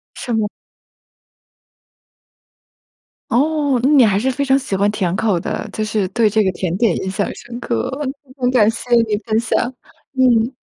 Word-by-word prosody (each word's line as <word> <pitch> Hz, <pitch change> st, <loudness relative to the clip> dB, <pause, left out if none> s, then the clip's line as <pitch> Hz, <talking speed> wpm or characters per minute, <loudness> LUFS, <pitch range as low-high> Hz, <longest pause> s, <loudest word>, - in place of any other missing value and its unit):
什 240 Hz, -, -4 dB
么。 215 Hz, -2 st, +1 dB, 2.8 s
哦， 285 Hz, 0 st, +1 dB
那 270 Hz, -, +4 dB
你 280 Hz, -5 st, +6 dB
还 200 Hz, -1 st, +2 dB
是 260 Hz, +4 st, 0 dB
非 280 Hz, +3 st, -2 dB
常 270 Hz, 0 st, +3 dB
喜 230 Hz, -7 st, -3 dB
欢 200 Hz, +2 st, +2 dB
甜 190 Hz, -5 st, -1 dB
口 205 Hz, -4 st, +1 dB
的。 -, -, -4 dB
就 215 Hz, -, -3 dB
是 215 Hz, -3 st, -1 dB
对 230 Hz, -3 st, +2 dB
这 215 Hz, +1 st, +2 dB
个 190 Hz, -, +1 dB
甜 180 Hz, -1 st, -3 dB
点 220 Hz, -5 st, +2 dB
印 190 Hz, -, -3 dB
象 200 Hz, +1 st, -2 dB
深 240 Hz, 0 st, -9 dB
刻。 115 Hz, -, -2 dB
很 275 Hz, -2 st, -3 dB, 0.2 s
很 250 Hz, -1 st, +1 dB
感 225 Hz, -4 st, +4 dB
谢 235 Hz, +2 st, -6 dB, 0.2 s
你 210 Hz, -1 st, 0 dB
分 220 Hz, -1 st, +1 dB
享， 245 Hz, +2 st, -1 dB, 0.4 s
嗯。 250 Hz, -2 st, +3 dB
225 Hz, 185 characters per minute, -18 LUFS, 205-255 Hz, 2.8 s, 你